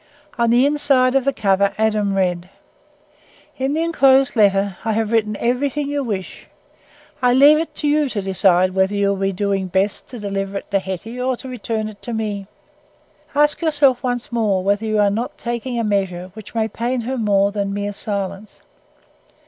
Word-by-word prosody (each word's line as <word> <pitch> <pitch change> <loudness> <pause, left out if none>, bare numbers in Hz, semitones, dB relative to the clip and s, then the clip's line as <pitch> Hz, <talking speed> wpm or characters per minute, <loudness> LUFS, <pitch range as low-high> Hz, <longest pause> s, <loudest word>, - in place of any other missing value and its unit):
On 235 -1 +1
the 240 +3 +4
inside 275 -3 +3
of 270 -1 +1
the 275 - +3
cover 200 -4 +1
Adam 215 -2 +1
read: 180 -2 -1 1.1
"In 270 +2 0
the 325 - 0
enclosed 270 -6 +3
letter 200 -3 +2
I 220 0 0
have 220 0 -1
written 215 -2 +1
everything 280 +4 -1
you 285 -1 -1
wish. 200 -6 -5 0.7
I 250 -1 +4
leave 290 +4 +6
it 325 - -4
to 300 - -2
you 295 -1 +2
to 220 - -3
decide 185 -1 +3
whether 190 +1 +1
you 200 0 +1
will 200 - 0
be 195 0 0
doing 195 0 -1
best 190 +3 -1
to 250 - -9
deliver 195 -2 -3
it - - -9
to 200 - +2
Hetty 190 +6 -6
or 255 0 0
to 265 - -10
return 225 -3 -3
it 210 -2 -11
to 240 - -5
me. 210 -3 -3 0.9
Ask 295 +2 +3
yourself 290 -6 +3
once 245 -1 -3
more 210 -5 0
whether 205 +3 0
you 215 0 0
are 205 -1 +3
not 230 +5 -3
taking 240 +1 -4
a 230 - 0
measure 190 -3 -2
which 220 +1 -12
may 220 -1 +1
pain 240 +3 -2
her 255 +3 -3
more 200 -2 +2
than 200 -1 -2
mere 205 0 -3
silence. 200 -1 -4
215 Hz, 190 wpm, -20 LUFS, 195-255 Hz, 1.1 s, leave